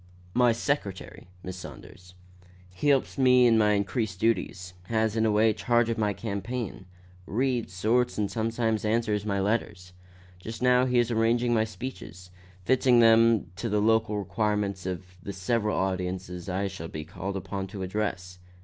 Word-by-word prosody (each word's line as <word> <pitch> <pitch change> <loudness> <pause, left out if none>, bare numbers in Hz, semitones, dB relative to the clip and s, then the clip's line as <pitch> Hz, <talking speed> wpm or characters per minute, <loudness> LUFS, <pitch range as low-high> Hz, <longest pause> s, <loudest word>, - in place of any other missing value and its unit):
My 125 -1 +4
secretary, 115 -7 -3 0.2
Miss 95 0 -6
Saunders. 90 0 -12 0.6
He 95 +11 -3
helps 140 -1 +2
me 125 -1 +6
in 115 -1 +5
my 105 -1 +4
increased 100 -1 -1
duties; 90 -4 -1
has, 110 +1 0
in 110 0 +2
a - - +2
way, 110 +1 +4
charge 120 +1 +1
of 115 - -3
my 105 -1 +1
campaign; 100 0 -5 0.4
reads, 120 -4 -1
sorts 120 +7 +1
and 105 -2 -1
sometimes 110 0 -1
answers 105 -1 0
my 100 -1 0
letters. 100 -3 -2 0.5
Just 110 +4 -7
now 125 0 +4
he 125 -1 +1
is 120 0 +2
arranging 120 +2 +2
my 110 -1 +2
speeches 105 -6 -8 0.3
fitting 130 -1 +4
them 115 -5 +5
to 115 - -3
the 105 0 +1
local 110 0 +2
requirements 105 -2 -1
of 90 0 -4 0.2
the 100 - -6
several 105 +2 -1
audiences 90 -1 -3
I 95 +2 -1
shall 80 -4 -7
be 75 -1 -7
called 95 +3 -5
upon 95 +1 -5
to 95 0 -6
address. 90 -2 -3
105 Hz, 160 wpm, -27 LUFS, 95-115 Hz, 0.6 s, me